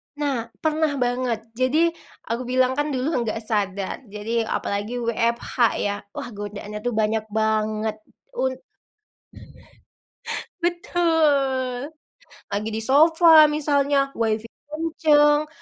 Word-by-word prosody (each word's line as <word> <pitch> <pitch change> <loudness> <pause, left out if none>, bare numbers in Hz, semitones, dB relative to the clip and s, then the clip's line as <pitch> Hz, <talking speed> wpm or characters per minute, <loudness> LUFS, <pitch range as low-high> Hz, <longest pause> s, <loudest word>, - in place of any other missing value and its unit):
Nah, 275 -6 -2 0.2
pernah 310 -1 +1
banget 245 -2 -1 0.2
jadi 310 +7 +3 0.4
aku 240 +2 -2
bilang 255 0 +2
kan 295 +1 +1
dulu 265 -1 -2 0.2
gak 220 +1 -3
sadar, 200 -3 -2
jadi 220 +2 -2
apalagi 205 +4 -2
WFH 235 +1 -1 0.3
ya 205 0 0 0.2
wah - - -5
godaannya 205 0 -7
tuh 245 +2 -2
banyak 220 0 0
banget, 215 0 0 0.4
un 260 0 0 2.1
Betul, 295 -7 +1 0.6
lagi 210 +2 -1
di 220 - -2
sofa 320 +3 +7
misalnya 285 -2 +1
Wi-Fi 225 -1 -1 0.2
kenceng 305 -1 +3
255 Hz, 105 wpm, -23 LUFS, 220-295 Hz, 2.1 s, sofa